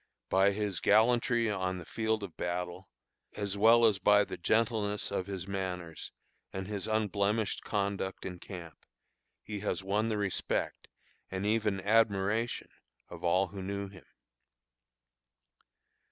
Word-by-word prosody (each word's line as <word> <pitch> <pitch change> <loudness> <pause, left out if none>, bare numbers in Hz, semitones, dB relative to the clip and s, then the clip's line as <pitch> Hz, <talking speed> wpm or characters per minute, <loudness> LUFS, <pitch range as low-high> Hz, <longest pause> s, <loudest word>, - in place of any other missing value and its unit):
By 95 +1 +5
his 100 -3 -2
gallantry 120 +2 +4
on 95 -3 -1
the 85 - -8
field 110 +3 -1
of 95 -5 -7
battle, 90 +1 -4 0.5
as 100 -1 -2
well 115 +3 +6
as 105 -4 +3
by 105 0 +5
the - - -6
gentleness 105 +1 0
of 95 -1 -2
his 95 -2 -5
manners 90 -4 -4 0.4
and 95 0 -5
his 100 -2 -4
unblemished 105 0 0
conduct 100 -2 -2
in 90 -1 -5
camp, 85 -4 -9 0.6
he 105 -1 -5
has 100 -1 -2
won 105 +4 +1
the 110 - 0
respect, 100 -2 -2 0.4
and 95 +1 -3
even 105 -2 +1
admiration, 110 +2 +2 0.4
of - - -10
all 90 +2 +3
who 100 +1 -7
knew 100 +1 -3
him. 95 -1 -15
100 Hz, 135 wpm, -31 LUFS, 95-110 Hz, 0.6 s, well